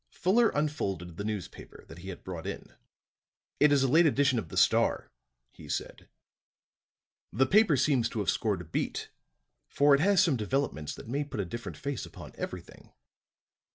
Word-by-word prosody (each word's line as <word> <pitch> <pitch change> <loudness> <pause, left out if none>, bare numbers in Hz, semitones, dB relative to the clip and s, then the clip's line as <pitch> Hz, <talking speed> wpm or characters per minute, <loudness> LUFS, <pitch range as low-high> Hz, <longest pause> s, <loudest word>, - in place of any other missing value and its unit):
Fuller 220 +6 +2
unfolded 95 - -2
the 100 - -4
newspaper 105 -4 -7
that 80 - -12
he 95 +2 -9
had 90 - -8
brought 90 -1 -6
in. 100 - -7 0.9
"It 150 0 +5
is 140 -2 +4
a - - +3
late 160 +6 +5
edition 140 -4 +2
of 85 - -7
the - - -7
Star," - - +2 0.4
he - - -14
said. - - -5 1.2
"The 130 +6 +2
paper 195 -2 +4
seems 130 -3 +2
to - - -7
have 100 - 0
scored 105 -5 -1
a - - -10
beat, 80 - -3 0.6
for 145 +1 +4
it 140 - +5
has 195 +1 +4
some 160 -8 +2
developments 110 - -2
that - - -11
may 140 +5 -1
put 140 -6 -7
a 100 - -1
different 115 +7 -7
face 140 -3 -4
upon - - -10
everything." - - -8
130 Hz, 175 wpm, -29 LUFS, 100-145 Hz, 1.2 s, It